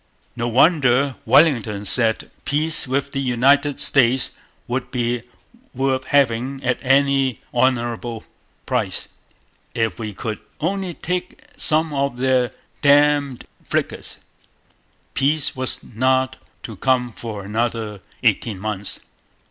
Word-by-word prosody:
No 120 0 -2
wonder 135 0 +3
Wellington 115 -10 +3
said 110 +1 +5
peace 150 +2 0
with 140 +2 -1
the 135 - -3
United 135 +3 +2
States 130 -3 +2 0.4
would 125 +1 -3
be 120 -1 -1 0.5
worth 130 0 0
having 135 -1 +1
at 125 -1 0
any 135 -2 +2 0.2
honourable 120 -2 0 0.4
price, - - 0 0.7
'if 115 0 -1
we 110 -2 -4
could 110 0 -4 0.2
only 185 +1 -2
take 180 +1 -4
some 155 0 +1
of 140 -2 -1
their 130 -1 +2 0.3
damned 145 -2 +3 0.2
frigates!' - - -3 1.0
Peace 140 +1 +1
was 130 -1 -3
not 130 +2 0 0.3
to 110 -4 -8
come 125 +1 +1
for 110 -3 -7
another 110 -1 -2 0.2
eighteen 105 -5 +1
months. 100 -1 -4
130 Hz, 110 wpm, -21 LUFS, 115-140 Hz, 1.0 s, said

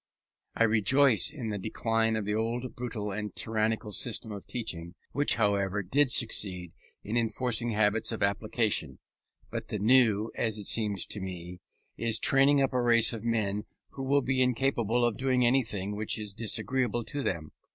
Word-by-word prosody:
I - - +2
rejoice 115 +2 +4
in 125 -7 -6
the 105 -1 -3
decline 115 +2 0
of 110 -2 -2
the 105 - -1
old 115 +3 -3
brutal 115 -4 -4
and 105 -1 -5
tyrannical 110 -1 0
system 110 +2 -2
of 100 -2 -8
teaching, 90 -7 -5 0.2
which, 145 +3 +3
however, 100 -2 0
did 135 +9 +2
succeed 95 - +1 0.3
in 105 - -4
enforcing 120 0 0
habits 110 +1 +2
of 115 - -3
application; 110 +2 0 0.5
but - - -5
the - - -3
new, 110 -1 +3
as 110 -2 -2
it 105 - -8
seems 105 -3 +1
to 105 - -4
me, 90 -1 -7 0.4
is 115 -1 +1
training 135 +2 +4
up 135 - -1
a 125 - +1
race 115 -1 +4
of 115 -2 -6
men 105 -3 -1 0.2
who 135 - -9
will 140 +1 +2
be 130 +1 0
incapable 125 -2 +1
of 120 -3 -1
doing 130 -2 +1
anything 110 -6 0
which 105 +1 -1
is 105 -2 -5
disagreeable 115 +2 -1
to 145 +5 -4
them. 80 - -3
110 Hz, 170 wpm, -29 LUFS, 105-125 Hz, 0.5 s, rejoice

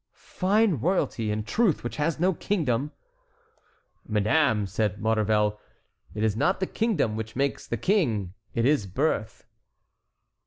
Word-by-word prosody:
"Fine 200 -1 +1
royalty, 135 - 0
in 105 0 -1
truth, 180 - +1
which 120 - -5
has 155 +1 0
no 185 +3 +3
kingdom." 150 - -1 1.2
"Madame," 110 +1 +2
said 100 +1 -1
Maurevel, 105 -1 +1 0.6
"it 105 - -2
is 110 -2 +1
not 180 - +1
the 190 - 0
kingdom 185 - 0
which 110 0 -5
makes 140 +1 -1
the 120 - -2
king: 115 - 0 0.2
it 115 - +1
is 140 -7 +2
birth." 110 - -2
120 Hz, 130 wpm, -26 LUFS, 110-165 Hz, 1.2 s, no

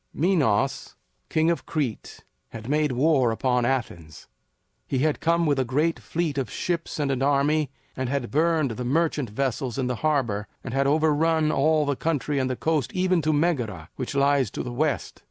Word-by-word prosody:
Minos, 140 - +1 0.3
king 160 +1 +2
of 170 - -3
Crete, 140 -8 -3 0.3
had 115 0 -9
made 150 +1 +1
war 135 -1 +3
upon 125 +1 +1
Athens. 90 - -3 0.6
He 135 - -1
had 155 - 0
come 170 +1 +2
with 145 -3 +2
a - - +3
great 150 +7 0
fleet 160 -4 -2
of 130 -5 -3
ships 170 +6 -3
and 145 -2 0
an 130 -1 -1
army, 145 +1 +2 0.3
and 130 -1 -3
had 135 -3 -2
burned 155 -2 +2
the 125 +3 -4
merchant 145 -1 0
vessels 130 +1 -2
in 130 - 0
the 125 -1 -2
harbor, 120 -9 0 0.2
and 125 - -6
had 135 0 +2
overrun 155 +1 +2
all 155 +2 +2
the 145 -1 0
country 145 -2 -1
and 130 -1 0
the 130 - -1
coast 150 -3 -1
even 185 -1 +2
to 155 +1 +1
Megara, 125 - -1
which 130 +2 -5
lies 140 -3 +3
to - - -5
the 125 - -5
west. 145 +1 -1
140 Hz, 185 wpm, -25 LUFS, 125-155 Hz, 0.6 s, war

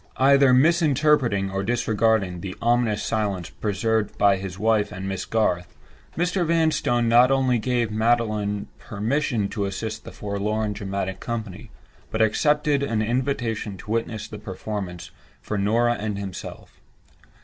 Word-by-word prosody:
Either 140 0 +5
misinterpreting, 140 - +3
or 95 0 -2
disregarding, 110 -4 +1
the 95 -2 -6
ominous 115 -2 +1
silence 100 -6 -2
preserved 110 +1 -1
by 100 -1 +4
his 95 -1 -6
wife 105 0 +1
and 95 +1 -6
Miss 95 -1 -3
Garth, 90 -6 0 0.4
Mr. 180 +2 +1
Vanstone 160 -8 +1
not 120 +2 +6
only 130 -3 +2
gave 120 -1 0
Magdalen 110 -2 0
permission 110 0 -1
to 100 -3 -2
assist 105 +3 -4
the - - -9
forlorn 105 +1 -2
dramatic 95 -2 -4
company, 110 -5 -5 0.4
but 110 - -3
accepted 145 +6 +2
an 115 -6 0
invitation 115 -4 -2
to 105 - -9
witness 115 -1 -2
the 105 -1 -9
performance 95 -3 -6 0.3
for 105 - -5
Norah 115 +4 +2
and 105 -1 -3
himself. 100 -3 -8
110 Hz, 135 wpm, -24 LUFS, 100-120 Hz, 0.4 s, not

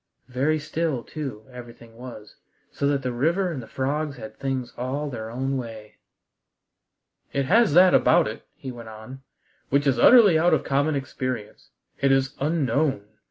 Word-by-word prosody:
Very 135 +5 +1
still, 155 -3 -2
too, 135 -9 -7
everything 120 -2 -12
was, 115 -4 -11 0.3
so 140 - -1
that 140 -1 0
the 125 - -1
river 170 +9 0
and 140 -6 -5
the 115 - -11
frogs 140 +1 -2
had 110 -2 -9
things 130 -3 -4
all 140 +4 -3
their 110 -3 -6
own 135 +3 -2
way. 110 -4 -8 1.4
"It 140 -1 0
has 215 - +4
that 180 +1 +7
about - - +4
it," - - -6
he 130 - -7
went 120 -2 -10
on, 110 +5 -11 0.5
"which 140 +1 +2
is 130 -4 +2
utterly 205 - +7
out 175 +2 +4
of - - -2
common 145 +2 +1
experience. 130 -5 -5 0.3
It 140 - +2
is 135 +1 +2
unknown. 140 -5 0
135 Hz, 160 wpm, -24 LUFS, 120-150 Hz, 1.4 s, that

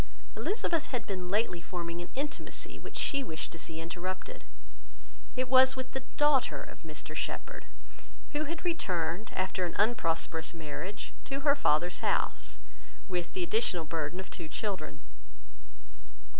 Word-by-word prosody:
Elizabeth 340 -6 +1
had 250 -3 -2
been 185 -3 -3
lately 200 -3 +2
forming 170 -1 -3
an 175 - -6
intimacy, 285 +2 -3
which - - -7
she 280 -2 +2
wished 160 -9 -3
to 165 - -7
see 160 0 -4
interrupted. 185 - -4 0.9
It 255 0 +1
was 260 0 +8
with 260 0 -4
the 265 - -1 0.2
daughter 295 -3 +5
of - - -10
Mr - - -6
Shepherd, - - -3 0.6
who 300 +1 +1
had 330 +3 -4
returned, 180 - 0
after 185 0 0
an 175 - -1
unprosperous 165 -7 +2
marriage, 165 +6 -5
to 275 0 -2
her 285 0 +6
father's 175 - +3
house, - - +1 0.5
with 180 -3 -1
the 370 - +1
additional 345 - +2
burden 160 +2 -1
of 190 - -6
two 170 -3 -4
children. 190 - -3
190 Hz, 145 wpm, -32 LUFS, 170-270 Hz, 0.9 s, was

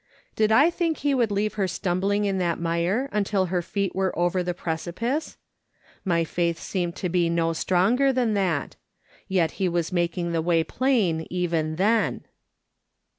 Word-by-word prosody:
Did 215 0 +2
I 285 +10 +5
think 335 -2 -1
he 285 0 0
would 240 -4 +2
leave 205 +1 -1
her 190 - +2
stumbling 195 +3 0
in 195 -1 0
that 170 -2 0
mire 170 +9 0
until 200 -2 +1
her 180 - +2
feet 200 +2 -2
were 190 -1 -1
over 175 +1 +1
the 180 0 -3
precipice? 180 - -3 0.7
My 170 -3 +1
faith 170 0 -1
seemed 175 -1 -3
to 185 - -3
be 175 -1 +1
no 165 0 +1
stronger 200 +11 +2
than 245 -4 +1
that. 180 -8 -1 0.5
Yet 175 -4 +1
he 185 - +2
was 170 0 -1
making 175 0 -1
the 165 -1 0
way 165 0 +2
plain 190 - 0
even 165 -3 -1
then. 215 +5 +1
185 Hz, 165 wpm, -25 LUFS, 170-210 Hz, 0.7 s, I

